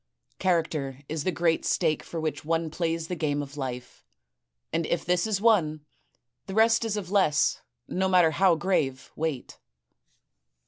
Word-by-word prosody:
Character 155 -7 0
is 155 -1 -4
the 185 - +2
great 165 -2 +1
stake 160 -4 +1
for 165 - -6
which 155 -1 -3
one 165 0 -1
plays 165 0 -2
the 180 - -3
game 145 -3 -1
of 140 0 -10
life; 125 -3 -6 0.7
and 165 0 0
if 170 -1 -1
this 180 +3 +1
is 210 -3 0
won, 165 -9 +2 0.6
the 190 - -5
rest 225 +1 +4
is 220 -2 -1
of 190 -3 -5
less, 170 -7 +2 0.3
no 190 +1 0
matter 180 -3 +5
how 180 +2 +4
grave, 150 -6 -1
weight. 155 -5 -4
165 Hz, 155 wpm, -27 LUFS, 150-185 Hz, 0.7 s, matter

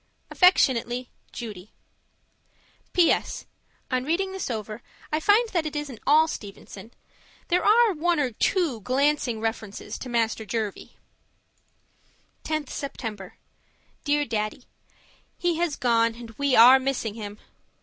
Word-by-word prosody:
Affectionately, 250 -8 +3 0.2
Judy 210 -4 -8 1.2
PS. 350 -2 +1 0.5
On 255 0 0
reading 355 +7 -1
this 385 -6 -4
over, 215 -1 -5 0.3
I 305 - +1
find 420 +8 +4
that 340 -6 -1
it 305 - -7
isn't 285 -6 -5
all 310 +2 +6
Stevenson. 200 -4 -9 0.6
There 355 +1 +2
are 450 0 +5
one 340 0 0
or 265 -4 0
two 285 - 0
glancing 260 0 +1
references 220 -2 -5
to 255 - -7
Master 225 -2 0
Jervie. 215 -2 -5 1.5
10th 310 -3 -3
September 220 -9 -6 0.7
Dear 290 -1 +1
Daddy, 215 +1 -3 0.7
He 350 -2 0
has 340 -3 0
gone, 230 -2 +2
and 235 -1 -10
we 280 +3 0
are 250 +4 +9
missing 260 -5 -2
him! 210 -2 -7
255 Hz, 120 wpm, -25 LUFS, 225-315 Hz, 1.5 s, are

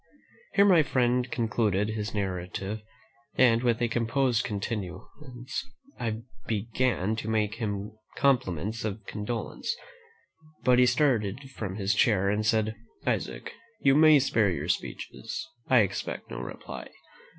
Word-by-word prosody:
Here 200 - +7
my 180 -5 +7
friend 125 -3 +1
concluded 110 -4 +1
his 110 -1 -3
narrative, 95 +1 -3 0.5
and, 115 -3 +5
with 120 -1 +2
a - - +3
composed 120 +1 +1
countenance, 115 - -5 0.3
I 115 -1 -2 0.2
began 110 -1 0
to 110 - -4
make 110 -1 0
him 105 0 -3 0.2
compliments 115 - +1
of 105 -1 -4
condolence; 115 - -3 0.9
but 125 -1 +5
he 125 - +6
started 125 -1 +1
from 100 -7 -5
his 100 -1 +1
chair, 100 -3 +3
and 105 +1 0
said, 110 0 +2 0.3
"Isaac, - - -2 0.3
you 135 - +4
may 155 +1 +7
spare 115 -6 +3
your 90 - -3
speeches; - - -3 0.2
I 130 -3 +6
expect 100 - -3
no - - -4
reply. - - -7
110 Hz, 130 wpm, -28 LUFS, 105-125 Hz, 0.9 s, Here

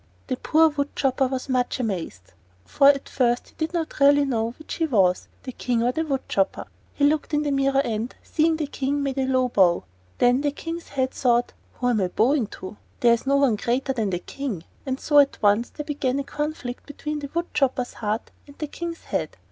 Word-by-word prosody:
The - - -2
poor 320 +5 +4
wood 285 -1 -3
chopper 265 0 +1
was 260 +1 -4
much 255 -1 0
amazed; 170 - -4 0.3
for 275 - +4
at 280 -1 +4
first 240 -2 0
he - - -25
did 315 0 -1
not 335 -3 -3
really 285 0 +6
know 230 -3 -1
which 310 - -8
he 325 - 0
was, 190 -9 +2 0.2
the 260 - -5
King 240 -1 -1
or 245 - +2
the 320 +5 -1
wood 275 -4 -2
chopper. 195 -1 0 0.3
He 285 - +3
looked 300 +1 +1
in 295 - +1
the 290 - -1
mirror 275 0 +2
and, 225 +2 -3
seeing 320 +1 +2
the 315 -1 -2
King, 280 0 -2
made 275 -1 -2
a 260 - +1
low 255 -1 +2
bow. 180 -6 +3 0.3
Then 245 +2 +4
the 290 - +1
King's 330 +2 -6
head 260 -2 -1
thought: 245 -1 +1 0.2
"Who 245 - -2
am 225 -4 +2
I 185 - +2
bowing 235 +6 +2
to? 190 +2 -9 0.2
There 235 -1 +6
is 235 +3 -2
no 275 - +3
one 275 -6 +3
greater 255 +5 0
than 220 -5 -1
the 180 - -1
King!" 205 - -5 0.2
And 260 0 -2
so 290 -1 +4
at 280 -1 +4
once 210 +3 +3
there 300 - -7
began 280 -3 -1
a 280 - -1
conflict 290 -3 -5
between 300 +1 -4
the 285 -1 -6
wood 340 +1 -2
chopper's 260 -3 0
heart 215 0 -3 0.2
and 285 - -15
the 305 - -3
King's 335 +3 -6
head. - - -3
265 Hz, 220 wpm, -24 LUFS, 235-290 Hz, 0.3 s, really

